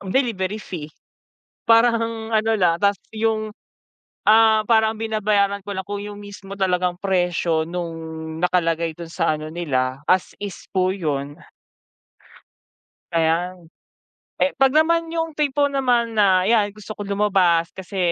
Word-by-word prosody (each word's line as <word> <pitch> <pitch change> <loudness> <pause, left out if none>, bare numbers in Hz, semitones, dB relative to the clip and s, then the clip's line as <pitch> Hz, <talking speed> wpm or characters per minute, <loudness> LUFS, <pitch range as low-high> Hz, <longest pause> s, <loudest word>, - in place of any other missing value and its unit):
delivery 200 -2 -1
fee. 175 -8 -7 0.8
Parang 230 -1 +2
ano 220 +1 +2
lang, 175 -3 +3
tapos 200 -2 +3 0.2
yung, 220 0 0 0.8
ah, 220 0 +5
parang 220 -1 +4
binabayaran 210 -2 0
ko 200 - -4
lang 190 - -3
kung 205 +1 -5
yung 205 0 -8
mismo 200 -1 -9
talagang 180 -2 0
presyo 175 -4 0
nung 170 -1 -4 0.4
nakalagay 165 -2 0
dun 170 0 -9
sa 165 -2 0
ano 155 0 -6
nila, 130 -6 -1
as 185 -1 +2
is 200 -3 -5 0.2
po 185 0 +1
yun. 145 -5 -3 1.8
Kaya, 170 +2 +1 0.8
eh 275 - +4
kapag 270 0 +4
naman 330 +1 +2
yung 325 -2 -3
tipo 285 -1 +1
naman 245 -4 +1
na 190 -3 +5
iyan, 205 0 +2
gusto 215 0 -10
kong 205 - -5
lumabas 185 -5 +2
kasi 190 +1 -9
200 Hz, 135 wpm, -22 LUFS, 175-220 Hz, 1.8 s, ah